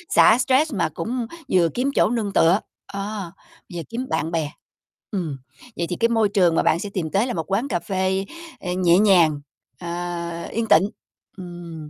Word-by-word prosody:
xả 220 - +7
stress 270 +3 +2
mà 170 -6 0
cũng 240 0 -3 0.2
vừa 175 -2 +4
kiếm 260 +3 0
chỗ - - +4
nương 220 -4 -2
tựa, 170 +5 +4 0.3
ơ, 200 -2 -5 0.4
vừa 170 - -4
kiếm 240 +3 -4
bạn 160 +2 -1
bè. 160 -3 -1 0.6
Ừm, 170 -9 -3 0.4
vậy 170 - -1
thì 175 - -2
cái 230 - +3
môi 225 -3 +2
trường 180 -5 +3
mà - - +2
bạn 165 - +3
sẽ 205 - -4
tìm 170 -4 -2
tới 210 +5 +2
là 245 - -2
một 165 +2 -4
quán 220 +8 +1
cà 180 -10 -1
phê, 190 +1 -1 0.3
ờ, 180 - -4
nhẹ 175 -1 +4
nhàng, 175 -8 +4 0.4
ờ, 175 - -7 0.6
yên 230 0 -1
tịnh, 190 +2 +5 0.5
ừm, 175 -4 -8
190 Hz, 185 wpm, -22 LUFS, 170-220 Hz, 0.6 s, xả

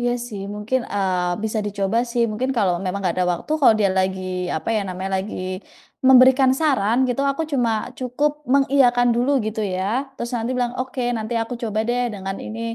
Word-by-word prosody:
Iya 245 0 +1 0.2
sih, 205 -4 -7
mungkin, 225 +5 -1
eee, 180 -2 0
bisa 220 0 -1
dicoba 200 +2 -1
sih, 235 0 +1
mungkin 250 +5 -2
kalau 190 -5 +2
memang 185 +2 -2
nggak 180 -3 0
ada 180 - +1
waktu, 175 - -4
kalau 225 - +6
dia 200 - +3
lagi 190 0 0 0.3
apa 155 - -5
ya 215 - +1
namanya 185 +1 -4
lagi, 200 +3 -5 0.7
memberikan 260 0 +7
saran 260 -7 +1
gitu, 250 +3 0
aku 275 +4 -2
cuma 245 -4 +2 0.3
cukup 260 +4 0 0.2
mengiyakan 260 -3 +4
dulu 245 +4 +1 0.2
gitu 220 0 -4 0.2
ya. 185 - -2 0.3
Terus 235 +1 -5
nanti 230 +2 -3
bilang, 245 -1 0
"Oke, 255 0 -3
nanti 220 +2 -4
aku 245 +2 -5
coba 215 -2 -2
deh 245 +1 +1
dengan 195 0 -5
ini. 225 +1 -6
230 Hz, 190 wpm, -22 LUFS, 195-255 Hz, 0.7 s, memberikan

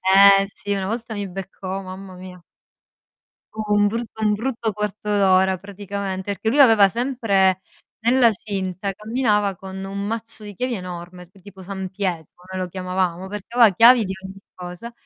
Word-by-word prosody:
Eh 195 +1 +7
sì, 205 0 -5
una 195 -1 -1
volta 230 +2 -4
mi 205 -2 -4
beccò, 195 +1 -6
mamma 185 0 -9
mia. 180 -1 -11 1.1
U 215 -1 -3
un 205 0 +4
brutto 225 0 -5
un 210 -1 +3
brutto 230 0 -2
quarto 210 +1 -4
ora 190 -2 +3
praticamente, 200 0 -5
perché 220 - -3
lui 280 +6 +3
aveva 225 -6 +7
sempre 200 -5 +1 0.4
nella 240 +1 +4
cinta 195 -2 -4
camminava 210 -2 0
con 190 +1 -8
un 195 +1 -6
mazzo 225 0 -3
di 205 -1 -9
chiavi 250 +5 -2
enorme, 180 -2 -8
tipo 200 -1 -13
San 190 0 -6
Pietro, 180 -5 -3 0.3
noi 185 - -3
lo 180 - -4
chiamavamo, 185 0 -2
perché 210 +4 -8
aveva 230 -4 +7
chiavi 235 +3 +7
di 190 - -3
ogni 190 +1 -9 0.2
cosa, 180 +6 -8
195 Hz, 165 wpm, -22 LUFS, 190-220 Hz, 1.1 s, Eh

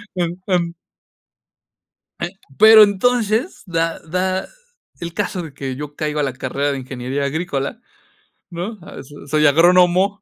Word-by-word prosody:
Enton 175 0 -1 1.4
e 175 - -2 0.3
pero 220 0 +9
entonces 225 - +1
da 165 -2 -1
da 185 +3 -2 0.5
el 170 -1 -6
caso 190 -3 -2
de 150 -4 -10
que 135 -2 -5
yo 145 +1 -7
caigo 150 -1 -2
a - - +1
la 135 - -1
carrera 140 +2 -2
de 140 - -3
ingeniería 130 +2 -4
agrícola, 155 - -3 0.7
¿no? 185 +6 -5
Ah, - - -10
so 145 +2 -13
soy 150 +2 +2
agrónomo. 180 +5 +4
170 Hz, 135 wpm, -19 LUFS, 145-190 Hz, 1.4 s, pero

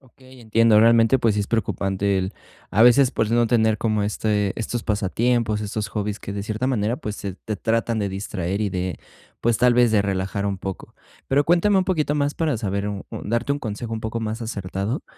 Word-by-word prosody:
Okey, 130 0 -18
entiendo, 110 -1 +4
realmente, 115 +2 +5
pues 115 -3 +2
sí 105 - 0
es 100 - -2
preocupante 100 -3 0
el 95 +2 -2 0.4
a 105 - +4
veces 125 +2 +6
pues 110 - 0
no 120 0 +3
tener 110 -2 +2
como 110 -2 0
este 105 -1 0
estos 115 +1 -3
pasatiempos, 110 +2 0
estos 105 0 -3
hobbies 105 0 -3
que 100 - -7
de 100 0 -4
cierta 110 +4 -2
manera, 120 -2 0
pues 105 -4 -5
se 100 -3 -6
te 110 - -2
tratan 115 0 0
de 100 - -1
distraer 95 -1 -3
y 105 - +1
de 90 -1 -3 0.4
pues 120 -1 +1
tal 125 0 +4
vez 120 -2 +4
de 105 - +4
relajar 95 0 -2
un 100 -1 -2
poco. 95 0 -7 0.3
Pero 140 +2 +3
cuéntame 175 +5 +3
un 185 - +2
poquito 155 -6 0
más 145 0 0
para 155 -6 0
saber 100 -1 -2
u 100 -1 -6
u - - -6
darte 120 +5 -1
un 145 - -3
consejo 115 0 -5
un 110 - -3
poco 110 +1 -3
más 110 +1 -4
acertado. 100 - -3
110 Hz, 215 wpm, -23 LUFS, 100-120 Hz, 0.4 s, veces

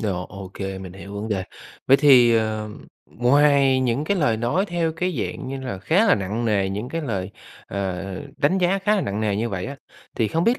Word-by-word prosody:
Rồi, 95 -5 -2
OK, 100 -1 -10 0.2
mình 90 -2 -8
hiểu 100 +1 -10
vấn 105 +2 -4
đề. 95 -3 -1 0.4
Vậy 135 - +7
thì, 125 -5 +6
ờ, 110 -1 -1 0.4
ngoài 135 +1 +4
những 130 +3 0
cái 200 +4 0
lời 140 -10 +2
nói 125 - 0
theo 170 -3 -1
cái 180 0 -2
dạng 130 - -4
như 135 0 -5
là 125 -8 -5
khá 185 - +2
là 200 - +6
nặng 105 +5 -3
nề, 100 -3 +1
những 105 +5 -4
cái 165 - -3
lời, 100 -7 -3 0.4
ờ, 95 -2 -3 0.3
đánh 180 +7 +2
giá 185 +2 +2
khá 210 +2 +2
là - - +1
nặng 105 - -3
nề 105 -2 0
như 115 +2 -1
vậy 95 +1 -4
á, 140 +1 -6 0.4
thì 110 -3 +1
không 165 +2 0
biết 240 +2 +3
120 Hz, 220 wpm, -23 LUFS, 100-150 Hz, 0.4 s, Vậy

